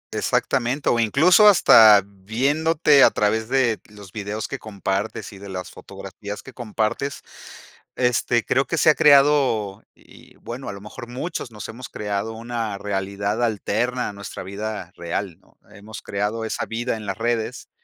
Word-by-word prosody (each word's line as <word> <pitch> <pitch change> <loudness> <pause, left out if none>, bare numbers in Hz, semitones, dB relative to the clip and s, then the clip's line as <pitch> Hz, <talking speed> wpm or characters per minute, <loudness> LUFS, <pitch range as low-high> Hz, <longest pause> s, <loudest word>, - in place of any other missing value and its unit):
Exactamente. 135 +2 0
O 120 - +2
incluso 160 - +5
hasta 110 - +8
viéndote 140 - +2
a - - +8
través 110 +2 0
de 130 -4 +1
los 100 -3 -13
videos 105 0 -5
que 135 - -6
compartes 100 0 -4
y - - -11
de 100 0 -10
las 90 -2 -6
fotografías 100 0 -9
que 135 - -12
compartes, 115 +4 -3 0.7
este, 120 -1 +1
creo 135 +1 +1
que 165 - -2
se 155 - +4
ha 150 - +5
creado, 140 -8 +4
y, - - -19
bueno, 125 +3 -8
a - - -5
lo 100 - -10
mejor 120 +3 -10
muchos 130 0 -5
nos 105 -1 -8
hemos 125 +3 -9
creado 105 +1 -3
una 115 -3 -4
realidad 100 +2 -2
alterna 120 +3 -1
a - - -8
nuestra 100 -2 -8
vida 100 -1 -6
real, 85 +1 -4
¿no? - - -29
Hemos 105 +1 -11
creado 105 +3 -3
esa - - -3
vida 115 0 -3
en 105 - -9
las 100 - -4
redes 115 +1 -2
110 Hz, 160 wpm, -22 LUFS, 100-125 Hz, 0.7 s, hasta